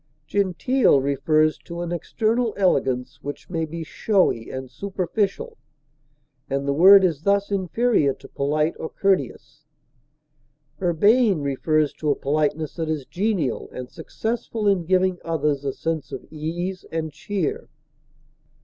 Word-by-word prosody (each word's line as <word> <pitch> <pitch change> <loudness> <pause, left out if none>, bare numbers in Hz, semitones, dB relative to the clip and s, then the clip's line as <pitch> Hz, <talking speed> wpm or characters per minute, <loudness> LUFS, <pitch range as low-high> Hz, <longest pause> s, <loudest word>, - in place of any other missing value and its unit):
Genteel 200 - +2
refers 155 +3 +1
to 170 0 -7
an 175 0 -4
external 225 +6 0
elegance, 130 -8 +1
which 145 +5 -7
may 165 -2 -1
be 165 +1 -6
showy 180 - +1
and 130 0 -6
superficial, 200 - -2 0.9
and 140 +1 -2
the 140 - +2
word 190 +6 +8
is 165 -6 +1
thus 200 +2 +1
inferior 195 - +2
to - - -14
polite 150 +3 0
or 160 - -4
courteous. 195 -1 -1 1.2
Urbane 200 - +3
refers 145 +2 +1
to 150 - -3
a 145 - +3
politeness 150 +2 -1
that 160 -2 -2
is 150 -4 -2
genial 185 - -1
and 125 0 -8
successful 220 +5 -3
in 190 -4 +2
giving 185 0 +2
others 150 -4 -1
a 140 - -1
sense 160 +1 -3
of - - -7
ease 175 +4 -4
and 160 -2 -3
cheer. 185 +2 -3
165 Hz, 130 wpm, -23 LUFS, 150-195 Hz, 1.2 s, word